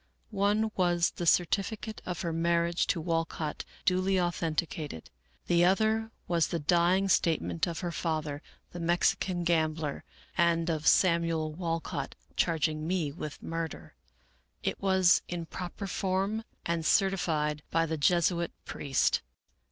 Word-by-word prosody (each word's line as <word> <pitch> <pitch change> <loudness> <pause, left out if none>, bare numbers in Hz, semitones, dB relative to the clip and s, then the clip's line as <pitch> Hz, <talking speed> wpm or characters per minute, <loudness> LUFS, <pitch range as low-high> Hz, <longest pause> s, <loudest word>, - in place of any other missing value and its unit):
One 210 +2 +2
was 175 -2 +2
the 175 - -4
certificate 205 +6 +1
of 180 -3 -3
her 170 -2 -2
mar 170 +1 +2
riage 170 0 0
to 170 - +1
Walcott 165 -1 -2 0.2
duly 185 +1 +2
authenticated; 165 - -2 0.3
the 175 0 +3
other 220 +4 +2 0.2
was 170 -2 +2
the 170 - -2
dying 175 +4 +3
statement 165 -1 +1
of 170 -1 -4
her 175 -2 -2
father, 155 -4 -2 0.3
the 175 - -7
Mexican 175 +1 +1
gambler, 160 -3 0 0.3
and 170 -1 +2
of 155 -1 -2
Sam 170 -3 +5
uel 160 -2 -1
Walcott, 165 -4 -3 0.2
charging 155 -2 0
me 170 -5 0
with 150 -1 -7
murder. 165 -1 -5 0.7
It - - -2
was 190 -2 +4
in 175 -1 -4
proper 180 +4 -6
form 195 +4 -1 0.2
and 170 -1 -1
certified 155 -5 +1
by 165 0 +2
the 160 0 -2
Jesuit 170 +2 +2
priest. 135 -2 +1
170 Hz, 135 wpm, -30 LUFS, 160-185 Hz, 0.7 s, Sam